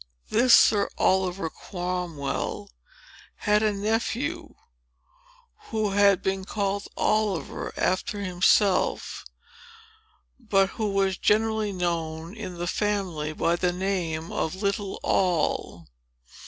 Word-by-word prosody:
This 240 Hz, +2 st, +6 dB
Sir 205 Hz, -2 st, +4 dB
Oliver 185 Hz, -2 st, +1 dB
Cromwell 180 Hz, +2 st, -4 dB, 0.6 s
had 210 Hz, 0 st, +2 dB
a 215 Hz, -1 st, +2 dB
nephew, 235 Hz, +9 st, -2 dB, 1.1 s
who 215 Hz, -2 st, 0 dB
had 200 Hz, -1 st, +4 dB
been 190 Hz, 0 st, -1 dB
called 200 Hz, 0 st, -2 dB
Oliver, 210 Hz, -5 st, 0 dB
after 185 Hz, +2 st, 0 dB
himself, 185 Hz, +1 st, +2 dB, 1.2 s
but 195 Hz, -5 st, +2 dB
who 215 Hz, -2 st, -2 dB
was 195 Hz, -1 st, +1 dB
generally 220 Hz, 0 st, +2 dB
known 170 Hz, -1 st, -3 dB
in 185 Hz, -5 st, -7 dB
the 175 Hz, -, -3 dB
family 180 Hz, -6 st, -1 dB
by 165 Hz, +2 st, +1 dB
the 180 Hz, +1 st, +1 dB
name 175 Hz, -3 st, -2 dB
of 160 Hz, -, -2 dB
little 200 Hz, 0 st, -2 dB
Noll. 180 Hz, -5 st, 0 dB
195 Hz, 100 wpm, -26 LUFS, 175-210 Hz, 1.2 s, This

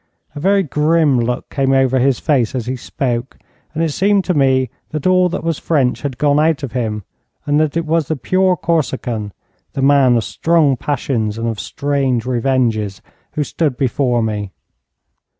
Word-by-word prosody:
A -, -, -5 dB
very 195 Hz, +4 st, +2 dB
grim 150 Hz, -2 st, +2 dB
look 120 Hz, +1 st, -2 dB
came 135 Hz, -1 st, +1 dB
over 130 Hz, -1 st, +3 dB
his 130 Hz, -1 st, +2 dB
face 130 Hz, -7 st, +1 dB
as 120 Hz, -3 st, -2 dB
he 130 Hz, +2 st, -2 dB
spoke, 125 Hz, 0 st, -3 dB, 0.4 s
and 165 Hz, -, 0 dB
it 160 Hz, -, 0 dB
seemed 195 Hz, +4 st, +2 dB
to 180 Hz, -, +1 dB
me 130 Hz, -4 st, +2 dB, 0.2 s
that 155 Hz, -2 st, -5 dB
all 185 Hz, 0 st, +4 dB
that 170 Hz, -, -4 dB
was 165 Hz, -2 st, -1 dB
French 135 Hz, -6 st, 0 dB
had 140 Hz, -4 st, -4 dB
gone 145 Hz, 0 st, +2 dB
out 155 Hz, -1 st, +1 dB
of 135 Hz, -, -4 dB
him, 110 Hz, -4 st, -3 dB, 0.4 s
and 145 Hz, 0 st, +2 dB
that 155 Hz, 0 st, 0 dB
it 165 Hz, -, -1 dB
was 160 Hz, -2 st, 0 dB
the 160 Hz, -, -1 dB
pure 185 Hz, +7 st, +1 dB
Corsican, 125 Hz, -10 st, -2 dB, 0.4 s
the 135 Hz, -, -2 dB
man 135 Hz, -3 st, +4 dB
of 115 Hz, -, 0 dB
strong 160 Hz, -2 st, +2 dB
passions 120 Hz, -5 st, -2 dB
and 115 Hz, 0 st, -2 dB
of 110 Hz, -2 st, -3 dB
strange 135 Hz, -4 st, -1 dB
revenges, 120 Hz, -5 st, 0 dB, 0.3 s
who 150 Hz, -, 0 dB
stood 145 Hz, -3 st, -2 dB
before 125 Hz, -3 st, +1 dB
me. 105 Hz, -3 st, -3 dB
135 Hz, 180 wpm, -17 LUFS, 120-155 Hz, 0.4 s, all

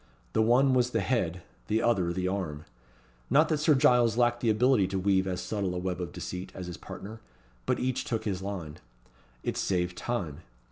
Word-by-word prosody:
The 110 Hz, -, +3 dB
one 125 Hz, +4 st, +4 dB
was 125 Hz, -1 st, +3 dB
the 115 Hz, -, 0 dB
head; 90 Hz, -7 st, -1 dB, 0.2 s
the 110 Hz, +2 st, +1 dB
other 95 Hz, -8 st, +2 dB
the 90 Hz, +1 st, -1 dB
arm. 90 Hz, -6 st, -3 dB, 0.6 s
Not 150 Hz, +5 st, +4 dB
that 155 Hz, -2 st, +1 dB
Sir 155 Hz, 0 st, +4 dB
Giles 120 Hz, -3 st, +4 dB
lacked 120 Hz, -1 st, +3 dB
the 120 Hz, -, +1 dB
ability 110 Hz, -2 st, +4 dB
to 95 Hz, 0 st, -2 dB
weave 95 Hz, 0 st, +2 dB
as 90 Hz, -1 st, -2 dB
subtle 100 Hz, -4 st, -2 dB
a -, -, -2 dB
web 90 Hz, 0 st, -3 dB
of 85 Hz, -, -4 dB
deceit 90 Hz, +1 st, -6 dB
as 90 Hz, -, -6 dB
his 90 Hz, -1 st, -6 dB
partner; 110 Hz, +3 st, -9 dB, 0.5 s
but -, -, +1 dB
each 130 Hz, 0 st, -1 dB
took 115 Hz, -2 st, -2 dB
his 95 Hz, -3 st, -2 dB
line. 90 Hz, -6 st, -5 dB, 0.7 s
It -, -, -2 dB
saved 90 Hz, -1 st, 0 dB
time. 90 Hz, -13 st, -3 dB
100 Hz, 195 wpm, -29 LUFS, 90-120 Hz, 0.7 s, one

